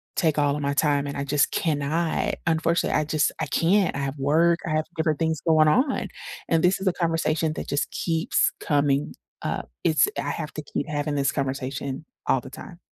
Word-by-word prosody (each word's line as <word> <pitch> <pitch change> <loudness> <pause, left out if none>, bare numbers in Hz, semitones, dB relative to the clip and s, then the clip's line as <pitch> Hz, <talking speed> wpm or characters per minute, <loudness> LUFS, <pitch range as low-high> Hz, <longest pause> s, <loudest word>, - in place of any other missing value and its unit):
take 155 -3 +1
all 145 -1 +2
of 150 - -4
my 140 0 0
time, 145 -1 +2
and 140 - -5
I 140 - -2
just 140 0 +2
cannot. 155 +1 0
Unfortunately, 165 +1 +1
I 155 - +1
just 155 0 +2
I 155 - -1
can't. 180 +6 +2
I - - -2
have 140 0 -3
work, 165 +5 +3
I - - -2
have 155 0 0
different 155 -2 0
things 160 -2 0
going 155 -2 +4
on, 260 - +2 0.4
and 165 -1 +2
this 180 +2 +3
is 195 - -2
a 180 - +3
conversation 165 -2 0
that - - -5
just 145 - -1
keeps 165 -2 +1
coming 145 -1 +1 0.3
up. - - -3
It's 160 - +4
I - - -2
have 155 -2 -5
to 155 - -5
keep 140 - -4
having 145 0 -2
this 140 -1 +1
conversation 135 +1 -3 0.2
all 135 - +3
the - - -10
time. 175 -2 -10
155 Hz, 205 wpm, -25 LUFS, 140-165 Hz, 0.4 s, going